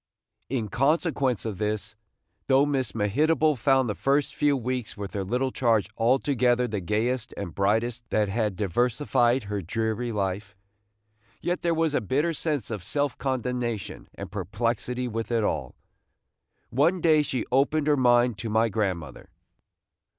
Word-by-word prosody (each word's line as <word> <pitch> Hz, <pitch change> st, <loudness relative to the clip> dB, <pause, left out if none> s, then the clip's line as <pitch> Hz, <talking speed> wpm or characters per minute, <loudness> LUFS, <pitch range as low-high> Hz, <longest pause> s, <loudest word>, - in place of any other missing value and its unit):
In 120 Hz, -4 st, -1 dB
consequence 135 Hz, -, +1 dB
of 105 Hz, -4 st, -4 dB
this, 105 Hz, 0 st, -2 dB, 0.5 s
though 135 Hz, +2 st, +5 dB
Miss 135 Hz, -3 st, -1 dB
Mehitable 150 Hz, +9 st, +2 dB
found 130 Hz, +1 st, +2 dB
the 105 Hz, -, -1 dB
first 140 Hz, +7 st, +1 dB
few 145 Hz, -1 st, +2 dB
weeks 125 Hz, -2 st, -3 dB
with 100 Hz, -1 st, -6 dB
her 100 Hz, -, -2 dB
little 125 Hz, +7 st, -1 dB
charge 110 Hz, -6 st, +1 dB
altogether 125 Hz, 0 st, +2 dB
the 105 Hz, -3 st, -3 dB
gayest 110 Hz, +6 st, -1 dB
and 85 Hz, -5 st, -5 dB
brightest 115 Hz, +5 st, 0 dB
that 105 Hz, -1 st, +2 dB
had 105 Hz, -1 st, -1 dB
diversified 120 Hz, -, +1 dB
her 100 Hz, -1 st, -3 dB
dreary 110 Hz, +6 st, -2 dB
life, 100 Hz, -1 st, -3 dB, 0.8 s
yet 175 Hz, +1 st, -2 dB
there 170 Hz, -1 st, +1 dB
was 160 Hz, -2 st, +1 dB
a -, -, +1 dB
bitter 145 Hz, -, 0 dB
sense 145 Hz, -8 st, -2 dB
of 105 Hz, -5 st, -4 dB
self 140 Hz, +6 st, -1 dB
condemnation 125 Hz, -4 st, -3 dB
and -, -, -8 dB
perplexity 115 Hz, +5 st, -2 dB
with 115 Hz, -1 st, -4 dB
it 115 Hz, -2 st, +2 dB
all. 70 Hz, -10 st, -2 dB, 1.0 s
One 160 Hz, +9 st, +2 dB
day 155 Hz, -2 st, +4 dB
she 135 Hz, -4 st, -2 dB
opened 140 Hz, +3 st, +2 dB
her 150 Hz, -1 st, +4 dB
mind 120 Hz, -4 st, +3 dB
to 110 Hz, -, -4 dB
my 110 Hz, +2 st, +2 dB
grandmother. 95 Hz, -6 st, -3 dB
120 Hz, 150 wpm, -26 LUFS, 105-135 Hz, 1.0 s, though